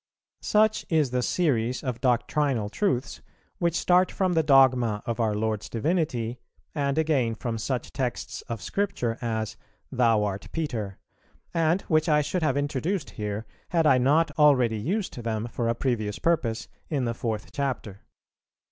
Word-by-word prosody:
Such 215 +1 +3
is 155 -6 +2
the 125 0 +1
series 125 -4 0
of 125 -3 -3
doctrinal 125 -2 +1
truths, 135 - -1 0.4
which 170 -2 +1
start 180 0 +3
from 185 -2 0
the 165 - +4
dogma 130 -7 +4
of 115 0 -3
our 110 -2 +1
Lord's 110 0 -2
Divinity, 125 -4 -1 0.3
and 140 -1 -1
again 140 -8 +1
from 115 0 -4
such 125 +2 -3
texts 130 -3 -3
of 115 -2 -4
Scripture 160 - -1
as 110 -2 -2 0.3
"Thou 115 -5 +3
art 100 -1 -3
Peter," 115 - -3 0.6
and 170 +2 +2
which 155 0 +2
I 150 -1 +4
should 180 +5 -2
have 155 -3 +1
introduced 145 +4 -1
here, 105 -1 -4 0.2
had 165 -3 +2
I 130 -4 +5
not 150 +6 +3
already 130 -7 +4
used 190 - -2
them 110 0 -2
for 120 - -1
a 115 - +1
previous 110 -5 -1
purpose 140 -10 0 0.2
in 140 -5 0
the 115 - -1
Fourth 110 -2 -4
Chapter. 125 -8 -3
130 Hz, 155 wpm, -26 LUFS, 115-155 Hz, 0.6 s, I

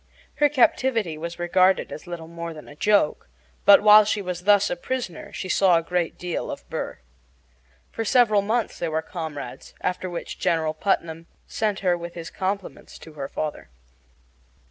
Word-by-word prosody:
Her 295 0 +4
captivity 240 - +2
was 170 +2 -6
regarded 185 +2 +2
as 155 - -8
little 170 -2 -7
more 170 0 -7
than 155 - -11
a 145 - -12
joke; 205 -2 +1 0.4
but 200 0 +8
while 210 0 +9
she 210 0 -1
was 180 -2 -5
thus 205 -1 +4
a - - 0
prisoner 195 -2 -5
she - - -5
saw 185 -2 +4
a 165 - -1
great 175 0 -2
deal 175 -1 -4
of - - -7
Burr. - - -4 0.9
For 225 - -3
several 220 -3 +4
months 225 +3 -1
they 170 - -1
were 160 0 -1
comrades, 150 -7 -7
after 180 0 -2
which 175 -1 -6
General 160 -2 +1
Putnam 165 -1 -2 0.2
sent 210 -3 -2
her 180 -2 +2
with 170 0 -8
his 165 -1 -7
compliments 195 0 -4
to 160 - -13
her 140 -2 -5
father. 155 +1 -5
180 Hz, 170 wpm, -24 LUFS, 165-205 Hz, 0.9 s, while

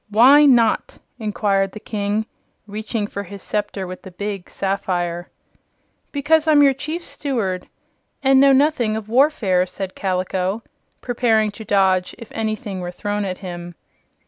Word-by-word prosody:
"Why 260 +8 +7
not?" 235 -4 +3 0.2
inquired 200 -3 0
the 215 - -8
King, 210 0 -2 0.4
reaching 215 +1 -3
for 200 -1 -5
his 200 0 -10
scepter 205 -2 -2
with 185 0 -8
the - - -10
big 195 0 -5
sapphire. 175 -3 -2 0.8
"Because 305 +2 +2
I'm 295 -2 +6
your 275 -1 +5
Chief 310 +6 -5
Steward 210 -10 -3 0.6
and 270 0 +5
know 275 0 +6
nothing 265 -5 +3
of 215 -1 -7
warfare," 225 -9 +3
said 190 +1 -6
Kaliko, 185 +2 -1 0.4
preparing 225 -3 +1
to 220 - -10
dodge 190 -3 +2
if 230 - -11
anything 215 -2 -3
were 175 -1 -4
thrown 205 +3 -3
at 185 -1 -3
him. 175 -1 -7
210 Hz, 145 wpm, -21 LUFS, 190-245 Hz, 0.8 s, Why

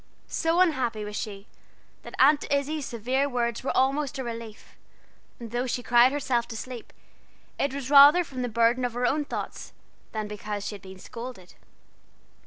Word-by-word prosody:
So 330 +2 +1
unhappy 250 -11 +1
was 210 0 -6
she, 200 -2 -5 0.6
that - - -10
Aunt 290 +2 +5
Izzie's 285 0 0
severe 255 +5 -1
words 235 -2 -2
were 270 - -1
almost 275 +1 +1
a 265 - -3
relief; 230 -2 -8 0.6
and 230 -2 -8
though 245 +2 -1
she 245 0 -2
cried 245 +1 +5
herself 260 -4 0
to 225 - -7
sleep, 245 0 -8 0.7
it 280 - +1
was 275 0 -5
rather 290 +5 +9
from 265 -5 -7
the 245 - -2
burden 235 +2 +2
of 245 -2 -1
her 245 +1 -1
own 295 +4 +1
thoughts - - -6 0.4
than 215 -1 -3
because 210 -1 -5
she 210 - -4
had 200 - -9
been 190 0 -11
scolded. 230 -2 -9
245 Hz, 175 wpm, -26 LUFS, 230-275 Hz, 0.7 s, rather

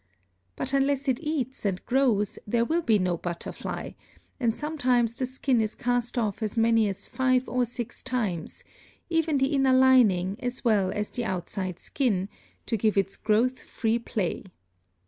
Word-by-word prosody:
But 265 - -3
unless 275 0 +1
it 255 -2 +1
eats 290 -5 -2
and 195 -3 -2
grows 240 -6 +1
there 235 +2 +2
will 330 +6 +1
be 225 -9 +3
no 180 -3 0
butterfly, 170 0 -5 0.5
and 235 -3 +1
sometimes 255 -7 +1
the 255 - -2
skin 260 -2 +1
is 215 0 -2
cast 245 0 -1
off 215 -2 -1
as 215 +1 -2
many 225 -1 +4
as 195 - -5
five 255 -1 +1
or 250 0 +1
six 240 -1 -6
times, 215 -11 -3 0.5
even 325 -3 +2
the 270 +2 +1
inner 270 -2 +3
lining 225 -8 +4
as 250 +1 -4
well 205 -5 +3
as 210 +1 -3
the 240 -2 -3
outside 185 -1 -3
skin, 200 -8 -1 0.4
to 225 - -1
give 215 0 +1
its 195 0 +1
growth 230 +4 +1
free 225 +1 -1
play. 210 -4 -3
235 Hz, 165 wpm, -27 LUFS, 205-260 Hz, 0.5 s, many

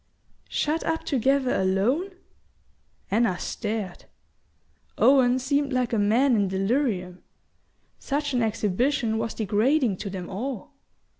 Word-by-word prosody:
"Shut 310 +2 -1
up 325 0 -1
together 270 0 +1
alone?" 225 - +1 1.0
Anna 205 -4 +2
stared. 210 -4 -4 0.9
Owen 255 -2 +5
seemed 280 +2 0
like 250 -1 0
a 225 - +2
man 235 +6 +3
in 205 -2 +2
delirium; 190 -2 -1 0.8
such 285 0 -2
an 245 - +1
exhibition 225 +2 0
was 225 0 -3
degrading 220 +2 +1
to 200 - -5
them 185 -2 -6
all. 240 +5 -5
235 Hz, 115 wpm, -25 LUFS, 205-275 Hz, 1.0 s, Owen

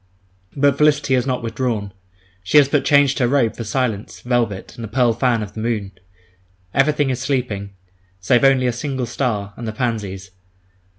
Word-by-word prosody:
But 140 0 +2
Felicity 150 -2 +3
has 130 0 +1
not 125 -2 -1
withdrawn; 115 -4 -2 0.5
she 95 +9 +3
has 145 -2 +7
but 145 0 +1
changed 145 -1 +3
her 125 - +3
robe 125 -3 +1
for 115 - -5
silence, 110 -2 -3
velvet, 120 -6 -1
and 115 - -8
the - - -4
pearl 120 +1 +2
fan 120 -1 +1
of 100 -1 -9
the 110 - -7
moon. 110 -3 -2 0.8
Everything 145 0 +2
is 130 - -2
sleeping, 120 -7 -3 0.4
save 120 +8 +2
only 135 -2 +4
a 125 - +1
single 130 0 -3
star, 110 -5 -2
and 115 - -7
the - - -2
pansies. 105 -5 -3
120 Hz, 175 wpm, -20 LUFS, 110-135 Hz, 0.8 s, has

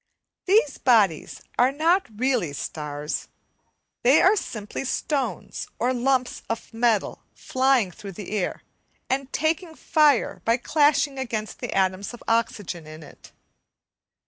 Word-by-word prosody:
These 370 -8 +3
bodies 210 - +2 0.2
are 250 +2 +5
not 335 +7 +2
really 245 - 0
stars; 150 0 -4 0.7
they 265 +5 +5
are 385 +4 +5
simply 215 - -5
stones 260 - -2
or 250 +2 +1
lumps 255 0 0
of 230 +1 -4
metal 225 -2 +1
flying 260 -7 +1
through 195 +2 -9
the 200 +2 -8
air, 205 -4 -2 0.5
and 270 0 -1
taking 320 +2 -1
fire 300 -6 +2
by 230 +1 +3
clashing 285 0 +2
against 220 -4 -4
the 245 - -4
atoms 190 +3 0
of 240 - -15
oxygen 205 -7 -1
in 155 +1 -10
it. 145 - -15
245 Hz, 125 wpm, -24 LUFS, 200-275 Hz, 0.7 s, are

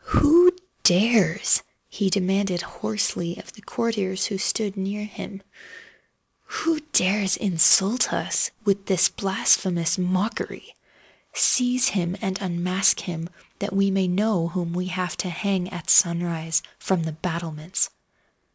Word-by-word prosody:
"Who 340 +5 +6 0.3
dares,"—he 195 0 +2
demanded 190 -1 0
hoarsely 180 -5 -3
of - - -12
the 210 - -16
courtiers 205 -4 -2
who 195 -3 -3
stood 205 0 -1
near 200 +2 -4
him—"who 315 - -8
dares 195 0 +2
insult 195 +4 +4
us - - -1 0.2
with 200 -1 0
this 185 -3 +3
blasphemous 185 -3 +1
mockery? 185 +5 -3 0.6
Seize 250 0 +2
him 180 -1 -2
and 190 +1 -3
unmask 180 +1 +1
him—that 180 +3 -7
we 195 0 +2
may 190 -1 +1
know 185 -1 +1
whom 170 -1 -4
we 180 +1 -3
have 185 -1 -3
to 185 - -3
hang, 180 +1 -2
at 175 -3 -2
sunrise, 170 -1 +2 0.2
from 185 -3 0
the 160 - -3
battlements!" 165 +1 -3
190 Hz, 115 wpm, -23 LUFS, 175-205 Hz, 0.6 s, Who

